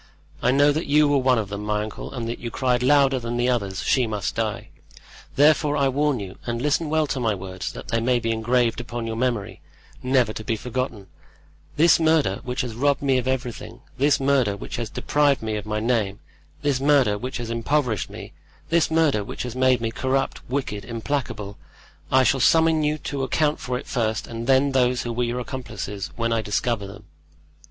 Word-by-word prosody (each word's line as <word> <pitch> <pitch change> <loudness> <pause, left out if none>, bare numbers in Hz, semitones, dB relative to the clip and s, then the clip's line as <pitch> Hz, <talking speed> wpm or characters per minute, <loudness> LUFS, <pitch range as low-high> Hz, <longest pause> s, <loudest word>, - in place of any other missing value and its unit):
I 125 - +2
know 145 +3 +5
that 155 +3 -2
you 150 +1 +4
were 145 -1 +3
one 130 -1 +3
of 105 -3 -2
them, 100 0 -5
my 105 0 -1
uncle, 110 - -7
and 120 -4 -4
that 115 - -4
you 120 - -5
cried 125 0 0
louder 135 0 +4
than 120 0 -4
the 120 +1 +1
others: 100 -6 -1
'She 130 -3 +2
must 105 -3 -2
die.' - - -3 0.7
Therefore 150 +1 +4
I 140 -1 +3
warn 145 -1 +1
you, 95 -2 -8
and 120 0 -2
listen 150 +4 0
well 155 0 +2
to 140 -2 -3
my 110 -4 +1
words, 95 -1 -6
that - - -10
they 115 - +1
may 125 +2 +2
be 115 -1 -1
engraved 120 +1 +1
upon 120 -1 -5
your 115 0 -3
memory, 120 -4 -2 0.4
never 125 -4 +2
to 110 - -6
be 110 - -1
forgotten: 125 -3 -4 0.7
this 165 +2 +5
murder, 155 -11 +2
which 125 +1 -2
has 125 -3 -4
robbed 140 +4 +1
me 135 -2 +3
of 125 - -4
everything—this 130 +2 -1
murder, 135 -7 +2
which - - -6
has 115 -3 -3
deprived 145 -4 +1
me 110 -1 -2
of 105 0 -5
my 105 0 -1
name—this 120 +5 -2
murder, 135 -6 +3
which 125 +5 -5
has 120 -2 -5
impoverished 115 - 0
me—this 165 -1 -3
murder, 160 -9 +2
which - - -6
has 125 -1 -6
made 130 -2 +3
me 115 -1 -1
corrupt, 130 +3 -1
wicked, 125 -6 -3
implacable—I 115 0 -3
shall 135 +1 +2
summon 160 +3 +4
you 150 +1 +1
to 140 -2 -4
account 150 +3 +1
for 125 0 -3
it 130 - -8
first 110 -3 -1
and 115 0 -6
then 135 +1 +4
those 125 -2 +2
who 120 - -3
were 120 +1 0
your 120 +1 -2
accomplices, 110 -6 -5
when 115 0 0
I 115 - +1
discover 105 0 -1
them!" 100 +2 -11
125 Hz, 195 wpm, -23 LUFS, 115-140 Hz, 0.7 s, know